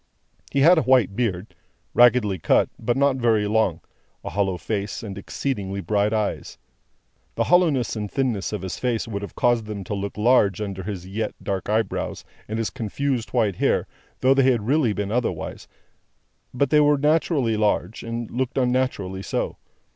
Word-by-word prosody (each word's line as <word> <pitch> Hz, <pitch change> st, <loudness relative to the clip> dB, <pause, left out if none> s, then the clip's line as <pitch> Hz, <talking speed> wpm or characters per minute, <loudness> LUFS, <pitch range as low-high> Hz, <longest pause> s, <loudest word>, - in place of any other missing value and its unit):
He 140 Hz, -, +1 dB
had 170 Hz, +4 st, +7 dB
a -, -, +1 dB
white 125 Hz, -8 st, +3 dB
beard, 105 Hz, -4 st, -2 dB, 0.4 s
raggedly 120 Hz, -6 st, +4 dB
cut, -, -, +3 dB
but 120 Hz, +3 st, 0 dB
not 140 Hz, -1 st, +3 dB
very 115 Hz, -4 st, +2 dB
long, 105 Hz, -6 st, +1 dB, 0.4 s
a -, -, -5 dB
hollow 95 Hz, -2 st, 0 dB
face, 100 Hz, +5 st, -4 dB
and 100 Hz, -3 st, -6 dB
exceedingly 100 Hz, -1 st, -3 dB
bright 100 Hz, +3 st, +1 dB
eyes. 110 Hz, -2 st, -2 dB, 0.8 s
The -, -, +1 dB
hollowness 165 Hz, -10 st, +2 dB
and 105 Hz, -2 st, -4 dB
thinness 125 Hz, -7 st, -1 dB
of 105 Hz, -3 st, -4 dB
his 95 Hz, -, -5 dB
face 120 Hz, -3 st, -1 dB
would 100 Hz, -3 st, -4 dB
have 100 Hz, -, -8 dB
caused 120 Hz, -2 st, +2 dB
them 105 Hz, -2 st, -6 dB
to 95 Hz, -, -5 dB
look 100 Hz, +1 st, -4 dB
large, 105 Hz, -4 st, +3 dB
under 100 Hz, -3 st, -4 dB
his 95 Hz, -2 st, -6 dB
yet 105 Hz, +3 st, -4 dB
dark 95 Hz, -1 st, -3 dB
eyebrows 110 Hz, +1 st, -1 dB, 0.2 s
and 110 Hz, -, -3 dB
his 115 Hz, -1 st, -2 dB
confused 125 Hz, +2 st, -2 dB
white 110 Hz, -7 st, 0 dB
hair, -, -, +1 dB, 0.4 s
though 130 Hz, +1 st, +5 dB
they 135 Hz, -, +3 dB
had 120 Hz, -4 st, +2 dB
been -, -, -8 dB
really 110 Hz, -, +1 dB
otherwise; 125 Hz, 0 st, -3 dB, 0.8 s
but, 130 Hz, +2 st, 0 dB
they 150 Hz, -, +6 dB
were 150 Hz, 0 st, +4 dB
naturally 150 Hz, -5 st, +2 dB
large, 105 Hz, -1 st, 0 dB
and 115 Hz, 0 st, -5 dB
looked 130 Hz, +2 st, -2 dB
unnaturally 125 Hz, -7 st, 0 dB
so. -, -, -3 dB
110 Hz, 170 wpm, -23 LUFS, 100-130 Hz, 0.8 s, had